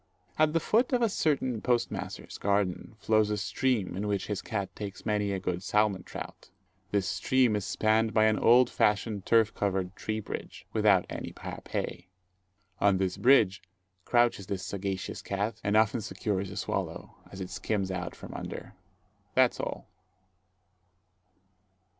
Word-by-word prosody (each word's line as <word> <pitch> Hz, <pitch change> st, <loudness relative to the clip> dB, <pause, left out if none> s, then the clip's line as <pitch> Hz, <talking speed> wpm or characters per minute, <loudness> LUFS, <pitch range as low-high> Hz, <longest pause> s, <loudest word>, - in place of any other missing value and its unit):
At 155 Hz, 0 st, +4 dB
the 165 Hz, -, +3 dB
foot 240 Hz, -, +2 dB
of 245 Hz, -1 st, +3 dB
a 230 Hz, -, +3 dB
certain 130 Hz, -, 0 dB
post 120 Hz, -2 st, +1 dB
master's -, -, -6 dB
garden, 100 Hz, +1 st, 0 dB
flows 110 Hz, -1 st, +2 dB
a 105 Hz, -, 0 dB
stream 110 Hz, -2 st, 0 dB
in 100 Hz, +3 st, -2 dB
which 100 Hz, -2 st, -1 dB
his 105 Hz, -2 st, -3 dB
cat 100 Hz, -4 st, -4 dB
takes 100 Hz, -2 st, -7 dB
many 105 Hz, -2 st, +1 dB
a 100 Hz, -, 0 dB
good 90 Hz, -2 st, -2 dB
salmon 105 Hz, -1 st, +1 dB
trout. -, -, -9 dB, 0.4 s
This 100 Hz, 0 st, 0 dB
stream 130 Hz, -4 st, +2 dB
is 105 Hz, -2 st, -2 dB
spanned 110 Hz, +1 st, +2 dB
by 110 Hz, 0 st, +4 dB
an 110 Hz, -1 st, +3 dB
old 120 Hz, +2 st, +6 dB
fashioned 105 Hz, -2 st, 0 dB
turf 115 Hz, -1 st, +4 dB
covered 95 Hz, -2 st, -1 dB
tree 110 Hz, 0 st, -3 dB
bridge, 110 Hz, -, -7 dB
without -, -, +4 dB
any -, -, -6 dB
parapet. 85 Hz, -, -5 dB, 0.7 s
On 100 Hz, -2 st, +4 dB
this 95 Hz, -1 st, 0 dB
bridge 110 Hz, -7 st, +4 dB, 0.4 s
crouches 120 Hz, -5 st, +2 dB
this 95 Hz, -2 st, -3 dB
sagacious 95 Hz, -1 st, -4 dB
cat, 100 Hz, +3 st, -3 dB
and 105 Hz, +1 st, +2 dB
often 110 Hz, +2 st, +3 dB
secures 100 Hz, -2 st, -2 dB
a 95 Hz, -, -8 dB
swallow, -, -, -4 dB
as 95 Hz, -, -9 dB
it 90 Hz, -1 st, -5 dB
skims 95 Hz, +1 st, -2 dB
out 90 Hz, -1 st, -4 dB
from -, -, -10 dB
under. -, -, -7 dB, 0.6 s
That's -, -, +4 dB
all. -, -, -4 dB
105 Hz, 155 wpm, -29 LUFS, 95-115 Hz, 0.7 s, old